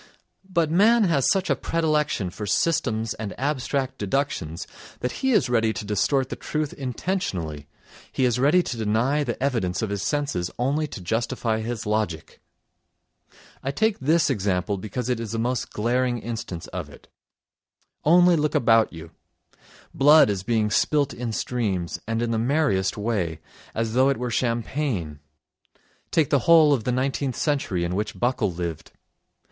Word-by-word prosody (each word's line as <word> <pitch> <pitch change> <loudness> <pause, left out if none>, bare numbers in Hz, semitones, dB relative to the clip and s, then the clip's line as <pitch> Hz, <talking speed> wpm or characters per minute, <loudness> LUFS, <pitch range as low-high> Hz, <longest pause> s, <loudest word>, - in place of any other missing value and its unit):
But 170 -4 +1
man 220 +6 +5
has 165 -8 +2
such 190 -1 +1
a - - +3
predilection 150 - 0
for 105 +3 -6
systems 115 - 0
and 110 -2 -7
abstract 135 -1 -1
deductions 100 - -2 0.4
that 125 - -1
he 265 - +2
is 205 - +3
ready 115 -2 +2
to 105 - -5
distort 130 +6 +1
the - - -4
truth 155 -1 -3
intentionally, 110 - -3 0.4
he 130 - +1
is 125 -1 +1
ready 150 +7 +4
to 120 - -4
deny 115 +7 +1
the 120 -4 -3
evidence 115 -9 0
of 105 - -2
his 100 -2 -2
senses 105 -7 -1
only 140 +5 0
to 100 - -8
justify 115 +3 -1
his 115 0 -4
logic. 105 -7 -2 1.2
I 135 - -3
take 210 +10 +1
this 155 +2 +2
example 100 -3 -1
because 110 +4 -4
it 125 -2 0
is 115 -2 -5
the - - -1
most 120 +2 -1
glaring 120 +3 0
instance 115 -7 -5
of - - -6
it. - - -16 1.0
Only 175 +2 +6
look 150 -1 0
about 115 -1 +4
you: 80 0 -10 0.8
blood 145 -4 +6
is 100 -2 -2
being 110 0 0
spilt 145 +2 +2
in 120 -1 -4
streams, 105 -7 -2
and 115 +1 -1
in 120 - -1
the 110 - 0
merriest 120 -8 +1
way, 100 -8 -2 0.4
as 115 0 -1
though 130 +2 +4
it 140 - +1
were 125 0 -3
champagne. 115 - -2 0.9
Take 155 -4 +1
the 140 - +4
whole 160 -3 +7
of 120 -5 -1
the 125 - +1
nineteenth 130 0 -1
century 135 - -1
in 85 +1 -2
which 105 +3 -3
Buckle 120 -5 +1
lived. 85 -2 -5
120 Hz, 160 wpm, -24 LUFS, 105-145 Hz, 1.2 s, whole